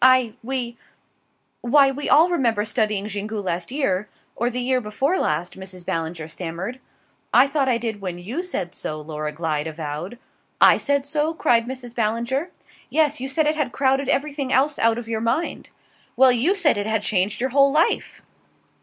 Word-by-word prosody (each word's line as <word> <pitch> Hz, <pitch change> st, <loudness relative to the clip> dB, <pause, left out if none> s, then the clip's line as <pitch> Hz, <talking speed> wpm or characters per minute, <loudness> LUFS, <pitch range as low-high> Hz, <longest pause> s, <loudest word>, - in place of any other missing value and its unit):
I 255 Hz, -3 st, +5 dB
we 240 Hz, -1 st, -4 dB, 0.8 s
why 275 Hz, +3 st, +5 dB
we 285 Hz, +2 st, -4 dB
all 320 Hz, +4 st, +6 dB
remember 230 Hz, -10 st, +1 dB
studying 210 Hz, -2 st, 0 dB
Xingu 210 Hz, +1 st, -4 dB
last 180 Hz, -3 st, -3 dB
year 210 Hz, -8 st, -1 dB, 0.3 s
or 240 Hz, +2 st, 0 dB
the 250 Hz, 0 st, -4 dB
year 255 Hz, +1 st, +1 dB
before 265 Hz, -, 0 dB
last," 165 Hz, +5 st, -1 dB
Mrs. 185 Hz, -2 st, -9 dB
Ballinger 165 Hz, -1 st, -3 dB
stammered. 175 Hz, +8 st, -5 dB, 0.5 s
"I -, -, +7 dB
thought 275 Hz, -1 st, 0 dB
I 240 Hz, -, +3 dB
did 225 Hz, -3 st, -4 dB
when 180 Hz, -3 st, -4 dB
you 220 Hz, -, -4 dB
said 195 Hz, -, -4 dB
so," 155 Hz, 0 st, -4 dB
Laura 150 Hz, 0 st, -5 dB
Glyde 155 Hz, -1 st, -2 dB
avowed. 160 Hz, +7 st, -5 dB, 0.4 s
"I -, -, +7 dB
said 280 Hz, -1 st, 0 dB
so?" 300 Hz, +2 st, -1 dB
cried 235 Hz, -6 st, +2 dB
Mrs. 255 Hz, -2 st, -7 dB
Ballinger. 235 Hz, +8 st, -1 dB, 0.4 s
"Yes. 300 Hz, -3 st, +1 dB
You 265 Hz, -, -2 dB
said 305 Hz, +4 st, +1 dB
it 305 Hz, +1 st, +2 dB
had 300 Hz, -5 st, -1 dB
crowded 270 Hz, 0 st, +1 dB
everything 280 Hz, -2 st, -1 dB
else 280 Hz, +3 st, +2 dB
out 230 Hz, 0 st, +3 dB
of 240 Hz, -1 st, -6 dB
your 225 Hz, -1 st, -2 dB
mind." 230 Hz, +9 st, -1 dB, 0.5 s
"Well 260 Hz, -1 st, +7 dB
you 260 Hz, -, +2 dB
said 315 Hz, -, +2 dB
it 205 Hz, -, -2 dB
had 220 Hz, -1 st, 0 dB
changed 200 Hz, 0 st, 0 dB
your 260 Hz, +1 st, -1 dB
whole 275 Hz, +1 st, +5 dB
life!" 310 Hz, +4 st, +1 dB
235 Hz, 180 wpm, -23 LUFS, 195-275 Hz, 0.8 s, I